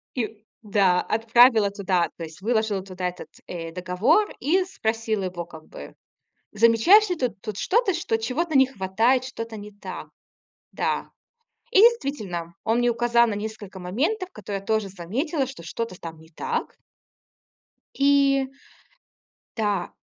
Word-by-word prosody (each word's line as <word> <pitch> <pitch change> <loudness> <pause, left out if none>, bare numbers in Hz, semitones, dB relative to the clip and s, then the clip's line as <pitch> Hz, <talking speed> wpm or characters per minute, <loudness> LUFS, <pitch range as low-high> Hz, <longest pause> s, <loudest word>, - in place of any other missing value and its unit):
и 220 -4 -4 0.2
да, 195 -4 +3
отправила 225 -1 +4
туда, 190 -4 0
то 165 - -6
есть 160 +2 -10
выложила 220 -2 0
туда 185 -1 -4
этот, 180 - -10 0.2
э, 165 -2 -6
договор 185 - +1
и 350 +8 +2
спросила 225 - -2
его 175 -2 -5
как 160 -2 -13
бы: - - -11 0.6
"Замечаешь 230 - +5
ли 360 - 0
ты 255 -5 0
тут 210 0 -8
что-то, 405 - +2
что 330 -9 0
чего-то 280 +7 -1
не 265 - +6
хватает, 230 +3 +1
что-то 230 -3 -6
не 210 0 -9
так?" 205 - -8 0.6
Да. - - -2 0.6
И 390 - +3
действительно, 220 - +1
он 225 +1 +2
мне 245 0 +3
указал 235 0 +3
на 210 - -1
несколько 205 -2 -6
моментов, 320 - -1
которые 200 -1 -5
я 195 - -19
тоже 220 -2 0
заметила, 255 - -2
что 265 -10 -10
что-то 185 +3 -5
там 165 -1 -8
не 160 - -17
так. 465 - -4 1.2
И 275 -1 +4 1.1
Да. 205 -4 -1
220 Hz, 145 wpm, -24 LUFS, 190-265 Hz, 1.2 s, не